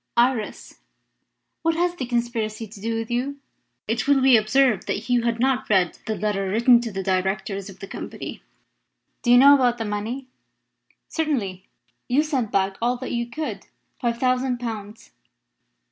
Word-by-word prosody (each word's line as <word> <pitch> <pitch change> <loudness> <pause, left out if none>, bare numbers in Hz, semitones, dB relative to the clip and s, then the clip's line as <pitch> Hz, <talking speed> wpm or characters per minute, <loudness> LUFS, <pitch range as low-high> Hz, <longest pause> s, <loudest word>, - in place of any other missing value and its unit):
Iris, 240 -2 0 0.8
what 330 0 +1
has 350 +1 +1
the 265 -8 -5
conspiracy 235 -2 -2
to 205 -1 -13
do 225 +1 -2
with 225 +1 -4
you?" 265 +4 -1 0.5
It 225 +3 -1
will 285 -1 +5
be 260 -1 +6
observed 220 0 +3
that - - +1
Hugh 245 0 +2
had 235 0 -1
not 260 +1 +1
read 185 -4 +2
the 220 - -1
letter 195 -1 -1
written 235 +4 +5
to 235 -2 -4
the 195 -1 -4
Directors 190 +1 -1
of 195 - -12
the - - -5
Company. - - -7 0.8
"Do 240 - -2
you 245 - +8
know 280 +3 +9
about 250 -3 +3
the 225 - -3
money?" 215 +6 -3 0.8
"Certainly. 220 - -2 0.4
You 275 +5 +3
sent 265 -8 -1
back 195 0 +1
all 245 +2 +1
that 260 - -6
you 235 -1 -1
could 235 -7 -5 0.3
five 235 -1 -1
thousand 255 0 +1
pounds. 220 -2 -7
235 Hz, 165 wpm, -23 LUFS, 210-255 Hz, 0.8 s, know